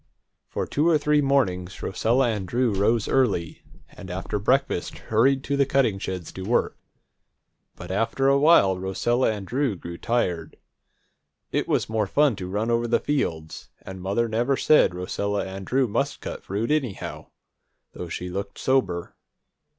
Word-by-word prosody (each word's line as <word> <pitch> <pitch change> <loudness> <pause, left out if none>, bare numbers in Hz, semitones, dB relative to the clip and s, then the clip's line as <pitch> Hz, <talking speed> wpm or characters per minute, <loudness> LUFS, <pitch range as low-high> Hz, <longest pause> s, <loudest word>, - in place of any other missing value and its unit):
For - - -3
two 155 +4 +1
or 160 - +5
three 150 0 +2
mornings 100 -10 0
Rosella 120 +7 +1
and 105 -4 -3
Drew 120 0 +1
rose 105 +3 +1
early, 100 -11 0 0.3
and 95 -2 -12
after 95 +3 -3
breakfast 130 +7 0
hurried 130 +5 +2
to 140 - -1
the 140 - +4
cutting 120 -8 +2
sheds 90 -4 -5
to 95 - -8
work. 110 +6 0 1.0
But, - - -8
after 115 +7 0
a 140 0 +4
while, 120 - +5
Rosella 115 +7 +1
and 105 -2 -5
Drew 130 0 0
grew 85 -1 -8
tired. 90 -9 -1 0.9
It - - -1
was - - +1
more 110 -2 0
fun 145 +2 +3
to 90 -2 -6
run 105 +4 -1
over 120 0 +1
the 120 - +2
fields, 80 - -3
and 95 -1 -8
mother 100 +5 0
never 120 +5 0
said 150 - +4
Rosella 100 +3 -2
and 95 0 -7
Drew 130 0 +2
must 105 - -1
cut - - -7
fruit, 105 +7 -2
anyhow, 135 -10 -2 0.7
though 90 - -7
she 90 +2 -5
looked 100 +2 -5
sober. 125 -10 0
110 Hz, 160 wpm, -24 LUFS, 95-130 Hz, 1.0 s, or